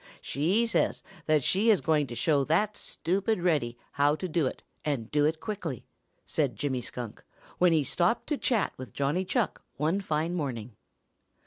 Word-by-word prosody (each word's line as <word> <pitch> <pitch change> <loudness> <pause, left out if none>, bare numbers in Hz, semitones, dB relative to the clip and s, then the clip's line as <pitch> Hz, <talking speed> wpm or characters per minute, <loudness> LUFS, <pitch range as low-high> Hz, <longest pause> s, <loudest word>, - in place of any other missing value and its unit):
She 180 +12 +1
says 230 - +1 0.2
that 155 -3 +3
she 205 - +3
is 210 -5 +6
going 150 0 +2
to 120 - -7
show 140 +3 +2
that 205 +8 +2
stupid 195 +5 -1
Reddy 150 -9 +1
how 145 +1 +3
to 185 - -4
do 155 -4 +1
it - - -6 0.2
and 130 -7 -2
do 145 0 +3
it 160 +1 +1
quickly," 180 - -4 0.4
said 140 -7 0
Jimmy 130 +2 -1
Skunk, 120 -2 -6 0.4
when 180 -1 +5
he 160 -3 +3
stopped 175 - +1
to 300 - +1
chat 230 -5 +1
with 130 - -8
Johnny 145 +7 +1
Chuck 215 +4 -1 0.2
one 160 +7 +1
fine 160 -1 -1
morning. 125 -9 -3
155 Hz, 175 wpm, -29 LUFS, 140-185 Hz, 0.4 s, is